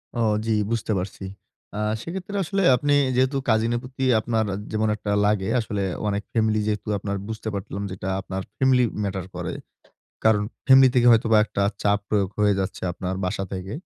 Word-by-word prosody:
ও, -, -, -2 dB, 0.3 s
জি, 115 Hz, -, +1 dB, 0.2 s
বুঝতে 115 Hz, -1 st, -1 dB
পারছি। 95 Hz, +1 st, -6 dB, 0.5 s
অ্যাঁ 105 Hz, +1 st, -1 dB
সেক্ষেত্রে 190 Hz, +5 st, -6 dB
আসলে 195 Hz, +3 st, -1 dB
আপনি 145 Hz, +2 st, +1 dB, 0.2 s
যেহেতু 130 Hz, +2 st, +2 dB
cousin 110 Hz, +1 st, +2 dB
এর -, -, -1 dB
প্রতি 130 Hz, +1 st, -6 dB, 0.2 s
আপনার 110 Hz, 0 st, 0 dB, 0.3 s
যেমন 110 Hz, 0 st, 0 dB
একটা 105 Hz, -1 st, -4 dB
লাগে, 105 Hz, -1 st, +1 dB
আসলে 105 Hz, -3 st, -2 dB, 0.2 s
অনেক 100 Hz, 0 st, -1 dB
family 110 Hz, -1 st, +2 dB
যেহেতু 105 Hz, 0 st, -2 dB
আপনার 100 Hz, 0 st, -3 dB
বুঝতে 110 Hz, 0 st, -6 dB
পারলাম 100 Hz, 0 st, -5 dB
যেটা 95 Hz, 0 st, -5 dB
আপনার 95 Hz, 0 st, -5 dB, 0.2 s
family 130 Hz, -1 st, +4 dB, 0.2 s
matter 95 Hz, -2 st, -3 dB
করে। -, -, -4 dB, 0.7 s
কারণ 110 Hz, -2 st, +4 dB, 0.3 s
family 130 Hz, 0 st, +8 dB
থেকে 120 Hz, -1 st, +5 dB
হয়তোবা 115 Hz, -1 st, +4 dB
একটা 100 Hz, -, -2 dB, 0.2 s
চাপ 100 Hz, 0 st, +3 dB
প্রয়োগ 100 Hz, -3 st, +1 dB
হয়ে 105 Hz, -1 st, +4 dB
যাচ্ছে 95 Hz, -, -3 dB
আপনার 90 Hz, +1 st, -4 dB
বাসা 90 Hz, +1 st, -2 dB
থেকে। 95 Hz, +2 st, -5 dB
110 Hz, 175 wpm, -24 LUFS, 100-120 Hz, 0.7 s, family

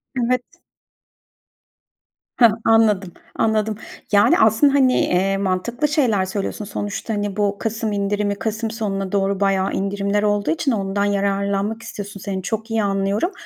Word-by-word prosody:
Evet. 250 Hz, 0 st, +1 dB, 2.0 s
Hah! 230 Hz, -3 st, +7 dB
Anladım, 210 Hz, -5 st, +3 dB, 0.2 s
anladım. 220 Hz, -1 st, +1 dB, 0.4 s
Yani, 205 Hz, 0 st, +5 dB
aslında, 220 Hz, +6 st, +4 dB
hani, 260 Hz, -2 st, +4 dB
eee, 195 Hz, +2 st, +1 dB
mantıklı 200 Hz, +9 st, -1 dB
şeyler 245 Hz, -, +1 dB
söylüyorsun. 200 Hz, +2 st, -4 dB
Sonuçta, 205 Hz, +2 st, -4 dB
hani, 205 Hz, -1 st, -3 dB
bu 200 Hz, -1 st, 0 dB
kasım 225 Hz, -1 st, -2 dB
indirimi 205 Hz, 0 st, -1 dB
kasım 220 Hz, +1 st, -3 dB
sonuna 195 Hz, -4 st, -3 dB
doğru 195 Hz, -1 st, 0 dB
bayağı 195 Hz, -1 st, +1 dB
indirimler 200 Hz, +1 st, -1 dB
olduğu 205 Hz, +3 st, +1 dB
için 310 Hz, -4 st, 0 dB
ondan 200 Hz, -1 st, -1 dB
yararlanmak 200 Hz, +2 st, -1 dB
istiyorsun, 205 Hz, -1 st, -7 dB
seni 190 Hz, -1 st, -4 dB
çok 220 Hz, +3 st, -4 dB
iyi 220 Hz, -1 st, +1 dB
anlıyorum. 200 Hz, -, 0 dB
205 Hz, 135 wpm, -21 LUFS, 195-225 Hz, 2.0 s, Hah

